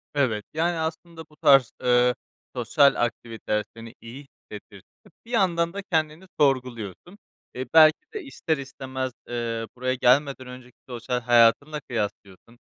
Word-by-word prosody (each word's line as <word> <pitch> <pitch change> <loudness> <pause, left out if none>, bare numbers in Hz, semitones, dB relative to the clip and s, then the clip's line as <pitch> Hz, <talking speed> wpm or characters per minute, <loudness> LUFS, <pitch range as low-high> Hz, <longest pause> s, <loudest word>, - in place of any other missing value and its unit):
Evet, 115 -7 0
yani, 165 +2 0
aslında 160 +1 -5
bu 150 - -21
tarz, 135 -4 +5
eee, 125 0 +3 0.4
sosyal 140 +4 +3
aktiviteler 115 -2 -4
seni 115 0 -11
iyi 115 +4 -10 0.3
hissettirse 100 -1 -11 0.2
de - - -19 0.2
bir 235 - -13
yandan 170 -6 +1
da 200 - -5
kendini 160 +2 -1
sorguluyorsun. 130 - -1 0.4
Eee, 130 - -4
belki 155 -1 +7 0.2
de 425 - -5
ister 165 - -3
istemez, 130 -1 -5 0.2
eee, 115 -1 -3
buraya 130 +1 -1
gelmeden 130 +1 +2
önceki 125 -1 -12
sosyal 125 0 -3
hayatınla 120 +6 +3
kıyaslıyorsun. 105 -1 -5
130 Hz, 135 wpm, -24 LUFS, 115-155 Hz, 0.4 s, belki